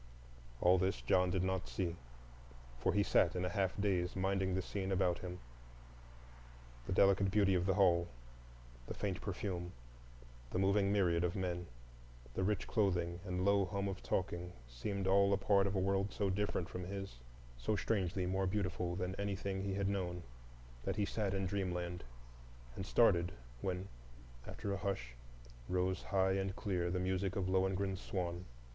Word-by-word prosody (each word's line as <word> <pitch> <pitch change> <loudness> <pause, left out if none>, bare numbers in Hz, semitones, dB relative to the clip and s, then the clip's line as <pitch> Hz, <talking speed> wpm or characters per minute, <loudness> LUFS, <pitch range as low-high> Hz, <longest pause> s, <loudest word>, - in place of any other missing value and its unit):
All 90 +1 +5
this 95 +3 +1
John 90 0 +3
did 90 0 +1
not 95 0 -1
see, 85 -3 -2 0.8
for - - +2
he 105 - +3
sat 85 -3 +3
in 90 0 0
a - - 0
half 95 +2 0
daze 95 -3 +1
minding 95 0 +1
the 95 - +1
scene 95 0 -3
about 90 -2 +2
him; 90 -1 -6 1.5
the - - -3
delicate 95 +1 +4
beauty 100 -1 +4
of 90 0 +1
the 95 - +3
hall, 85 -4 +4 0.8
the - - -5
faint 100 -4 -2
perfume, 90 -3 -3 0.8
the - - -2
moving 100 +1 +3
myriad 90 -4 +3
of 85 -1 0
men, 90 -2 -2 0.7
the 95 - -1
rich 105 0 0
clothing 90 -5 +1
and 90 -1 -2
low 100 0 +4
hum 100 +2 -2
of 95 -1 -4
talking 90 -1 -2
seemed 95 +12 -3
all 100 +1 +5
a - - +3
part 100 0 +3
of 100 - -2
a - - +2
world 95 +1 +1
so 100 -2 0
different 95 -3 -1
from 90 - -5
his, 95 -8 -6 0.4
so - - -1
strangely 95 -3 0
more 95 +1 0
beautiful 90 -3 -1
than 90 0 -2
anything 100 -1 -2
he 95 -1 -2
had 100 0 0
known, 90 -3 -2 0.6
that - - -1
he 105 - +1
sat 100 -2 -1
in 95 0 0
dreamland, 90 -2 -2 0.7
and 95 - -5
started 90 -6 +4 0.3
when, 95 +1 -2 0.6
after 100 - -3
a - - -1
hush, 95 - -3 0.6
rose 90 +1 +1
high 95 -1 +2
and 95 0 -1
clear 90 -5 -1
the 90 +1 0
music 95 +1 0
of 95 -2 0
Lohengrin's 95 0 +1
swan. 90 -1 -3
95 Hz, 165 wpm, -36 LUFS, 90-100 Hz, 1.5 s, All